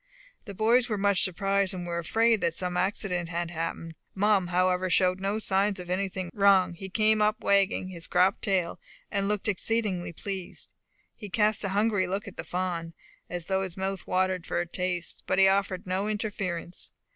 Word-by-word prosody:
The 200 -3 -8
boys 235 +4 +3
were 210 - 0
much 200 -1 +2
surprised, 195 +1 +1
and 180 -1 -5
were 170 0 -2
afraid 225 +5 +2
some 180 0 -2
accident 180 -2 -1
had 170 0 -3
happened. 165 0 -4 0.2
Mum, 200 -2 +3
however, 180 +1 +1
showed 185 +1 +3
no 200 +2 -1
signs 200 -1 +1
of 180 0 -6
anything 185 -1 -2
wrong; 195 -3 +4
he 190 +3 -8
came 215 +2 +3
up 210 0 +2
wagging 195 -1 +2
his 170 -3 -6
cropped 185 +2 +3
tail, 185 -4 0 0.3
and 200 -1 0
looking 210 0 0
exceedingly 200 -3 -1
pleased. 190 +1 -6 0.4
He 210 - -9
cast 215 +1 +2
a 195 - -1
hungry 205 -1 +1
look 195 +3 -3
at 200 - -8
the - - -4
fawn, 175 -2 -3 0.4
as 175 -2 -4
though 190 +1 0
his 185 -2 -5
mouth 190 -1 -3
watered 185 -1 0
for - - -1
a 175 - -1
taste, 180 0 -3
but - - +1
he 190 0 +7
offered 195 -1 +1
no 190 +3 -1
interference. 195 -5 -3
190 Hz, 180 wpm, -28 LUFS, 180-200 Hz, 0.4 s, he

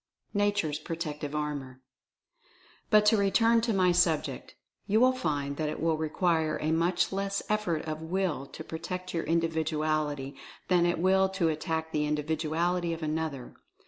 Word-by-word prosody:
nature's 205 -7 +1
protective 150 -3 -5
power. 145 -4 -4 1.1
But 210 -1 +5
to 220 +1 +5
return 225 +3 +4
to 230 0 0
my 185 -3 +3
subject. 175 -3 0 0.3
You 215 +2 +3
will 255 +2 +6
find 145 - -2
that 155 -1 -1
it - - -5
will 165 0 +2
require 160 0 0
a 155 - 0
much 170 +2 +1
less 195 0 -1
effort 210 -7 0
of 155 0 -4
Will 165 -4 -1
to 160 - -9
protect 180 +3 -5
your 165 - -1
Individuality 155 -3 0 0.3
than 175 -2 +4
it 175 - +1
will 190 +2 +3
to 190 -4 +1
attack 160 0 -2
the 150 -1 0
Individuality 160 +3 0
of 165 0 -6
another. 155 -4 -3
160 Hz, 150 wpm, -29 LUFS, 155-185 Hz, 1.1 s, will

